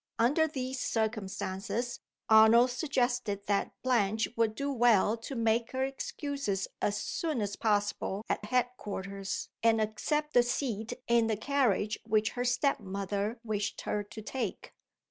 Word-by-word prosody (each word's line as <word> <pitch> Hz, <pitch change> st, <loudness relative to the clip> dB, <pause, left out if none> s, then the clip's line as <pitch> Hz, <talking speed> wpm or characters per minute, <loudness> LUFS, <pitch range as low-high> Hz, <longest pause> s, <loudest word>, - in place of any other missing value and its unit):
Under 290 Hz, +8 st, +3 dB
these 260 Hz, -3 st, -4 dB
circumstances, 220 Hz, +1 st, -2 dB, 0.3 s
Arnold 225 Hz, +3 st, +7 dB
suggested 245 Hz, -, -1 dB
that 200 Hz, -1 st, 0 dB
Blanche 225 Hz, -4 st, +2 dB
would 225 Hz, -1 st, +1 dB
do 280 Hz, +2 st, -2 dB
well 230 Hz, -4 st, +4 dB
to 230 Hz, +4 st, -7 dB
make 230 Hz, 0 st, +1 dB
her 260 Hz, 0 st, 0 dB
excuses 270 Hz, -6 st, -3 dB
as 205 Hz, 0 st, +1 dB
soon 315 Hz, -6 st, -2 dB
as 205 Hz, -1 st, -2 dB
possible 205 Hz, -1 st, 0 dB
at -, -, -1 dB
head 250 Hz, +2 st, +2 dB
quarters, 195 Hz, -1 st, -5 dB
and 225 Hz, -1 st, +4 dB
accept 300 Hz, +8 st, -1 dB
the 245 Hz, -, +7 dB
seat 240 Hz, -2 st, -2 dB
in 235 Hz, -1 st, +4 dB
the 220 Hz, -2 st, 0 dB
carriage 220 Hz, -4 st, +1 dB
which 215 Hz, -1 st, +1 dB
her 245 Hz, 0 st, -3 dB
step 250 Hz, +3 st, +2 dB
mother 200 Hz, +3 st, -3 dB
wished 210 Hz, -2 st, -2 dB
her 210 Hz, -, -1 dB
to 215 Hz, +1 st, -9 dB
take. 235 Hz, -3 st, -4 dB
225 Hz, 145 wpm, -31 LUFS, 210-250 Hz, 0.3 s, Arnold